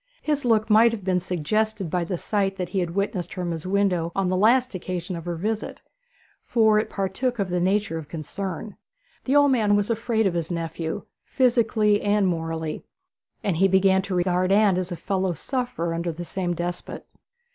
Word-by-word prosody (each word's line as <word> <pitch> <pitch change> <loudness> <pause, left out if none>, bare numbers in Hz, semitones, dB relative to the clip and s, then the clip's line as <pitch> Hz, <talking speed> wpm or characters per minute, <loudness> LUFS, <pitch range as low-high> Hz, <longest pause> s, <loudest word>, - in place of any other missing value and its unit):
His 295 -2 0
look 220 -2 +3
might 225 +2 +6
have 210 -4 -5
been 185 -1 +1
suggested 185 +2 -1
by 175 -1 0
the 180 +1 -3
sight 195 +1 -1
that 180 -3 -4
he 190 - -1
had 175 -1 -2
witnessed 200 -3 -2
from 180 -2 -2
his 165 +1 -5
window 185 -4 +1
on 195 -2 +1
the 185 - +1
last 240 +6 +3
occasion 180 0 -4
of 165 0 -7
her 175 -1 -2
visit, 215 +6 -3 0.6
for 220 -2 +3
it 215 - -2
partook 210 +6 -2
of 195 -4 -2
the 180 - +1
nature 190 -2 0
of 155 - -9
concern. 185 +5 -6 0.5
The 270 - +1
old 285 -1 +6
man 215 -5 +3
was 205 +2 +1
afraid 225 -1 0
of 190 - +2
his 170 -2 -2
nephew, 165 -1 -3 0.2
physically 225 -5 +2
and 205 0 +2
morally, 165 -3 -2 0.6
and 190 -6 0
he 195 +3 +5
began 190 0 +4
to 190 -1 -4
regard 180 +1 +1
Anne 200 -2 +4
as 185 0 -4
a - - -2
fellow 190 +2 -1
sufferer 205 - -3
under 170 +1 -2
the 170 +2 -7
same 175 0 -2
despot. 175 +1 -5
190 Hz, 190 wpm, -24 LUFS, 175-215 Hz, 0.6 s, might